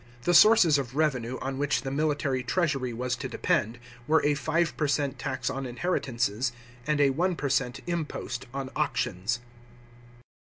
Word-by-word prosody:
The 175 - +2
sources 175 -5 +7
of 130 -1 -5
revenue 130 -5 0
on 135 0 -3
which 145 0 0
the 135 - -3
military 145 -2 0
treasury 135 -2 0
was 125 +2 -2
to - - -5
depend, 115 +3 0 0.3
were 160 0 +3
a 145 - +4
five 160 +4 0
per 150 - 0
cent, 140 -1 -1
tax 130 -2 -3
on 135 0 -2
inheritances, 120 - -1 0.4
and 150 -1 +1
a 140 -1 +5
one 175 +6 0
per 145 -3 -2
cent, 135 0 0
impost 155 -6 -4
on 135 -1 -5
auctions. 110 +7 -1
135 Hz, 160 wpm, -27 LUFS, 125-155 Hz, 0.4 s, sources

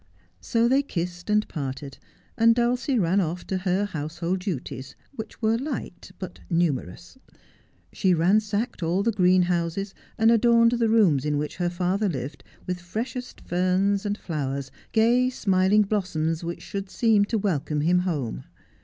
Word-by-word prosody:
So 230 - +1
they 265 +3 +4
kissed 175 -7 -5
and 210 0 +2
parted, 135 -2 -6 0.4
and 230 0 +5
Dulcie 245 +2 +1
ran 190 0 +2
off 175 +1 -3
to 190 - -2
her 190 +2 0
house 155 -4 -5
hold 175 +2 -1
duties, 135 - -5 0.2
which 225 -3 -9
were 220 +1 +2
light 255 - -6
but 185 - -8
numerous. 165 - -2 0.7
She 185 -3 +2
ransacked 205 +6 +1
all 175 +4 +1
the 230 - +2
greenhouses 180 -1 +1 0.2
and 225 0 +5
adorned 230 0 +5
the 235 -2 +1
rooms 195 - +4
in 150 -1 0
which 150 +1 -3
her 175 0 0
father 185 +4 0
lived 140 -1 -5 0.2
with 180 -1 -3
freshest 235 +8 -5
ferns 185 +3 +1
and 205 0 -2
flowers, 140 -6 -4 0.2
gay 240 +3 +3
smiling 200 -3 +3
blossoms 170 -6 -1
which 170 +1 -5
should 195 -1 -5
seem 220 -2 +3
to 225 +2 -1
welcome 155 -7 -1
him 175 +4 +3
home. 145 - -3
185 Hz, 155 wpm, -25 LUFS, 170-220 Hz, 0.7 s, and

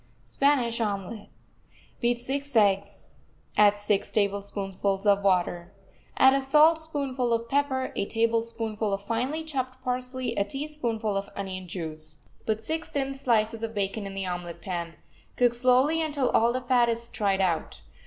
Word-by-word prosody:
SPANISH 250 -5 +2
OMELET 205 0 -3 0.7
Beat 240 0 +1
six 275 +2 -3
eggs. 200 -2 +2 0.5
Add 210 -1 +6
six 205 -1 0
tablespoonfuls 200 -1 -1
of 200 -1 +4
water. 180 -1 +1 0.4
Add 265 0 +7
a 275 - +2
saltspoonful 290 -3 +2
of 230 0 0
pepper, 270 0 0
a 200 - -1
tablespoonful 225 -1 -1
of 195 0 -3
finely 250 +9 -2
chopped 260 -4 -4
parsley, 250 -1 -2
a 200 - +2
teaspoonful 235 -4 -3
of 195 0 -2
onion 190 -2 -5
juice. 155 -3 -5 0.3
Put 220 0 0
six 320 +8 -3
thin 275 -1 -2
slices 225 -4 +1
of 225 -1 -4
bacon 200 +1 -2
in 195 - -8
the 195 -1 -3
omelet 175 -2 -5
pan. 170 -4 -5 0.4
Cook 245 -1 +3
slowly 255 +6 +4
until 290 -5 0
all 230 +1 +4
the 255 +1 -2
fat 245 -1 +3
is 235 0 -1
tried 200 -4 0
out. 180 -4 -1
230 Hz, 150 wpm, -27 LUFS, 200-260 Hz, 0.7 s, Add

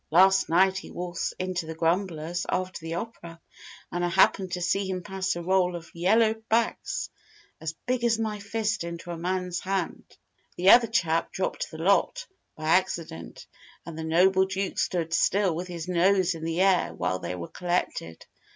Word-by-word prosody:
Last 190 +3 +5
night 190 +3 +4
he - - -11
waltzed 175 -1 -4
into 185 -3 -3
the 160 - -6
Grumblers 170 0 -1
after 185 0 -2
the 165 0 -5
opera, 170 -4 -7 0.5
and 175 0 -2
I 175 - +1
happened 190 +1 +3
to 180 - -1
see 195 +2 0
him 185 -1 -3
pass 190 0 -2
a 175 - -5
roll 180 0 +2
of 170 -1 -9
yellow 215 +6 +3 0.2
backs 235 - 0 0.5
as 160 0 -5
big 250 -1 -1
as 230 -2 +3
my 215 -2 -2
fist 210 -1 -2
into 170 +1 -6
a 170 - -5
man's 180 0 -2
hand. 190 -2 -3 0.5
The 185 +2 +6
other 235 -1 +7
chap 165 -7 0
dropped 190 - -3
the 160 - -9
lot, 200 - +2 0.3
by 155 - -10
accident, 165 - -1 0.4
and 165 -1 -7
the 160 - -5
noble 185 +4 +4
Duke 195 0 -3
stood 165 -2 -1
still 190 +1 +2
with 180 +2 -4
his 170 -2 -6
nose 185 +1 +3
in 160 -1 -7
the 165 +2 0
air 190 -2 +3
while 90 +1 -1
they 90 0 -4
were 85 -1 -6
collected. 175 - -3
180 Hz, 180 wpm, -27 LUFS, 170-195 Hz, 0.5 s, other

